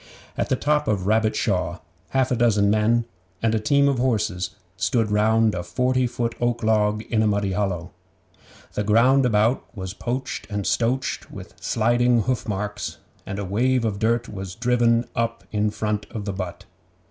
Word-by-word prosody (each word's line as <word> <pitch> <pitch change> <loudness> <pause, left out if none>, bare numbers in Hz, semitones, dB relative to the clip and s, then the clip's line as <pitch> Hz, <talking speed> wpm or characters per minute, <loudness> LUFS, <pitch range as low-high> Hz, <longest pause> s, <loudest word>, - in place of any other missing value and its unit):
At - - -2
the - - +3
top 150 +3 +1
of 100 -3 0
Rabbit 110 +1 +2
Shaw 90 -3 0 0.3
half 130 -1 +1
a - - +3
dozen 105 -4 +3
men 115 +2 +2 0.4
and 115 -1 +2
a 110 - +2
team 140 +6 +3
of 140 -3 +1
horses 105 -8 0 0.3
stood 115 +2 0
round 110 +1 +3
a 90 - -2
forty 125 +7 +1
foot 120 -1 -2
oak 120 -1 0
log 105 -1 +2
in 110 -2 +3
a 110 - +3
muddy 100 -1 0
hollow. 95 -3 -2 0.8
The 105 - -1
ground 125 +6 +4
about 110 +2 +2
was 95 -1 -5
poached 130 +5 -4
and 105 -2 -3
stoached 125 +3 0
with - - -10
sliding 120 +1 +2
hoofmarks, 105 -4 -3 0.3
and 100 - -4
a 100 - -3
wave 120 +5 +1
of 100 -3 -2
dirt 115 +2 +1
was 95 -2 -7
driven 120 -1 +2
up 115 0 -1
in 105 0 +1
front 105 0 -2
of 105 -3 -6
the 100 - -2
butt. 95 -2 -6
110 Hz, 170 wpm, -23 LUFS, 105-120 Hz, 0.8 s, ground